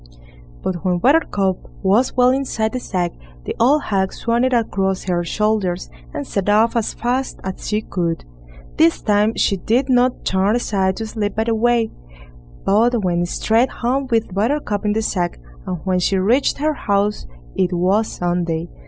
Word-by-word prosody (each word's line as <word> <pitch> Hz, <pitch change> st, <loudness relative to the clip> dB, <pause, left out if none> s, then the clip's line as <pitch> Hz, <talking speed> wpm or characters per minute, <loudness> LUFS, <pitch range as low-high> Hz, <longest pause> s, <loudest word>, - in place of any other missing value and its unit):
But 175 Hz, -2 st, -3 dB
when 180 Hz, -2 st, +1 dB
Buttercup 200 Hz, -, +2 dB, 0.3 s
was 215 Hz, +8 st, +2 dB
well 250 Hz, 0 st, +5 dB
inside 255 Hz, -5 st, -1 dB
the 255 Hz, -, -3 dB
sack, 180 Hz, -7 st, -2 dB, 0.3 s
the -, -, -4 dB
old 280 Hz, +6 st, +4 dB
hag 190 Hz, -2 st, 0 dB
swung 235 Hz, +1 st, 0 dB
it 260 Hz, -, +2 dB
across 195 Hz, -5 st, 0 dB
her 175 Hz, -2 st, 0 dB
shoulders, 205 Hz, -1 st, -1 dB, 0.2 s
and 140 Hz, -, -5 dB
set 200 Hz, +5 st, -2 dB
off 220 Hz, +3 st, +3 dB
as 230 Hz, -2 st, -1 dB
fast 255 Hz, +3 st, -2 dB
as 190 Hz, 0 st, -6 dB
she 210 Hz, 0 st, 0 dB
could. 170 Hz, -5 st, -2 dB, 0.5 s
This 165 Hz, -, +4 dB
time 210 Hz, +1 st, +2 dB
she 195 Hz, -, +1 dB
did 245 Hz, +8 st, 0 dB
not 250 Hz, 0 st, +2 dB
turn 190 Hz, +3 st, +2 dB
aside 190 Hz, -5 st, 0 dB
to 225 Hz, -, -3 dB
sleep 210 Hz, -2 st, -3 dB
by 220 Hz, -, +1 dB
the 230 Hz, 0 st, 0 dB
way, 230 Hz, 0 st, +2 dB, 0.7 s
but 225 Hz, +3 st, +3 dB
went 175 Hz, -1 st, 0 dB
straight 225 Hz, +7 st, +2 dB
home 260 Hz, +3 st, -1 dB
with 225 Hz, -5 st, 0 dB
Buttercup 210 Hz, 0 st, -1 dB
in 210 Hz, -, +2 dB
the 220 Hz, +1 st, 0 dB
sack, 175 Hz, -4 st, -2 dB, 0.3 s
and 180 Hz, -, -2 dB
when 185 Hz, -1 st, +1 dB
she 190 Hz, +2 st, +1 dB
reached 230 Hz, +9 st, +2 dB
her 305 Hz, +2 st, 0 dB
house 205 Hz, -5 st, -1 dB, 0.3 s
it 180 Hz, 0 st, +1 dB
was 190 Hz, +5 st, +2 dB
Sunday. 175 Hz, -1 st, -2 dB
210 Hz, 170 wpm, -20 LUFS, 185-235 Hz, 0.7 s, well